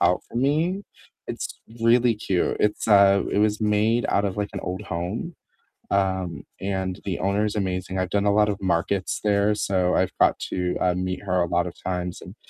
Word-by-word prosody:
out 90 +1 +3
from 120 - -2
me, 165 +8 +1 0.4
it's - - -6 0.2
really 120 0 +4
cute, 95 -4 0
it's, 105 0 0
uh, 100 -1 +6
it - - 0
was 105 +1 +2
made 110 +3 +2
out 100 - +2
of, 95 - -4
like, 105 -1 -2
an - - -4
old 90 +3 -4
home. 95 - -4 0.6
Um, 95 -5 0 0.2
and 95 -1 -2
the 95 -3 -2
owner's 105 +2 0
amazing, 95 -1 -2
I've 95 -1 -1
done 100 +1 +1
a 100 - +3
lot 105 0 +4
of 100 - -3
markets 95 +1 0
there, 105 0 +3
so, 95 -3 +1
I've - - +1
got - - +4
to, 90 -1 -1
uh, 90 -1 +2
meet 90 0 -3
her 90 -2 +1
a - - +2
lot 85 +1 +1
of 85 - -7
times 90 -1 -3
and, - - -11
100 Hz, 195 wpm, -24 LUFS, 90-105 Hz, 0.6 s, uh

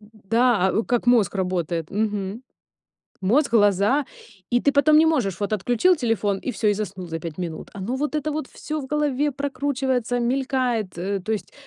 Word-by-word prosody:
Да, 215 -1 +1
у, 220 - 0
как 245 0 0
мозг 230 -6 +4
работает, 175 -4 -2
мгм. 210 +1 -2 0.8
Мозг, 240 +9 +2
глаза, 205 +5 +3 0.4
и 245 0 +3
ты 285 - +2
потом 300 +2 +5
не 315 - +6
можешь 235 - +1
вот, 205 +1 -1
отключил 245 - +3
телефон- 220 -7 0
и 255 - -3
всё, 215 -1 -1
и 205 - +4
заснул 195 -3 -5
за 165 0 -4
5 165 0 -7
минут. 170 -3 -5
Оно 205 +6 -3
вот 295 +3 -2
это 305 0 -1
вот 300 -2 -3
всё 310 0 -5
в - - -7
голове 295 -1 0
прокручивается, 265 -3 -1
мелькает, 245 -5 -1
э, 195 +3 -2
то 220 - -4
есть 215 - -4
230 Hz, 180 wpm, -23 LUFS, 195-270 Hz, 0.8 s, не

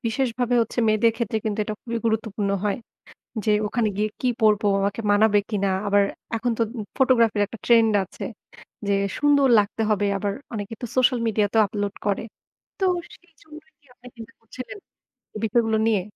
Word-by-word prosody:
বিশেষভাবে 235 +1 -1
ভাবে 245 0 +1
হচ্ছে 235 - -7
মেয়েদের 220 +1 +3
ক্ষেত্রে 225 -2 -1
কিন্তু 215 0 -2
এটা 215 - -4
খুবই 235 -1 -3
গুরুত্বপূর্ণ 220 -2 -1
হয়। 205 +2 0 0.7
যে, 215 - +3 0.2
ওখানে 225 0 0
গিয়ে 215 +1 0
কি 255 - +1
পড়ব? 215 -1 +4 0.2
আমাকে 200 +3 -1
মানাবে 205 0 +4
কিনা? 200 -2 0 0.2
আবার 200 0 +4 0.3
এখন 235 +2 -1
তো - - -1 0.2
উ - - -2 0.2
ফটোগ্রাফির 235 -5 +3
একটা 230 - -10
ট্রেন্ড 230 -2 +5
আছে। - - -10 0.6
যে 200 - +2 0.2
সুন্দর 285 -2 +4
লাগতে 205 +2 -1
হবে। 205 -1 +1
আবার 200 0 -2 0.2
অনেকে 210 +1 -5
তো - - -2
সোশ্যাল 255 -1 +3
মিডিয়াতেও 215 0 +2
আপলোড 205 -2 -3
করে। 205 +1 0 0.6
তো 385 - 0 0.3
সেইজন্যই 315 -2 -17
কি 285 - -30
আপনি 250 0 -14
চিন্তা 225 -1 -11
করছিলেন, 255 - -9 0.6
এই - - -4
বিষয়গুলো 225 0 +1
নিয়ে? 210 -4 +2
220 Hz, 170 wpm, -23 LUFS, 205-245 Hz, 0.7 s, ট্রেন্ড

